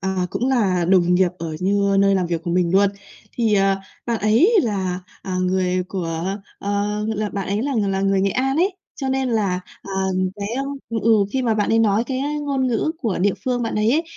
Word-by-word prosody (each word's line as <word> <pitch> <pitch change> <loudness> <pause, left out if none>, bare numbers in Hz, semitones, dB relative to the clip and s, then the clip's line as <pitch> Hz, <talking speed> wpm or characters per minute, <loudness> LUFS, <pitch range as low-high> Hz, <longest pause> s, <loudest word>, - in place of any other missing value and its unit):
à, 190 -2 -1
cũng 250 - -1
là 195 -9 +2
đồng 180 -2 +4
nghiệp 180 -1 +3
ở 160 -2 -4
như 200 +1 +2
nơi 195 0 +4
làm 185 -2 +1
việc 170 -1 -2
của 175 - -3
mình 175 -1 +1
luôn, 200 +1 +4 0.5
thì, 225 -3 +2
ờ, 195 0 +3 0.3
bạn 235 -2 0
ấy 220 - +4
là, 190 -5 -2 0.2
à, 185 -1 -3
người 185 0 +1
của, 165 -4 -3 0.4
ờ, 205 +1 -1
là 210 0 -1
bạn 195 -1 -4
ấy 205 +3 0
là 285 - -1
ng 205 -3 +1
là 195 - -1
người 195 0 +2
Nghệ 195 +1 +2
An 265 +6 0
ấy, 375 +3 +1 0.2
cho 270 -2 -3
nên 265 -1 0
là, 200 -6 0 0.2
à, 195 - -8 0.4
cái, 200 0 -4
a 270 - 0 0.3
ừ, 230 - -1
ừ, 230 - +3 0.2
khi 265 -1 0
mà 230 -2 +1
bạn 210 -1 0
ấy 225 - +3
nói 220 0 +3
cái, 260 0 -3
a, - - -1
cái 295 0 -2
ngôn 275 -3 0
ngữ 250 +6 0
của 225 -7 -1
địa 195 +2 +2
phương 245 -1 0
bạn 230 - -2
ấy 215 +2 +2
ấy, 320 - +2
200 Hz, 235 wpm, -21 LUFS, 190-235 Hz, 0.5 s, đồng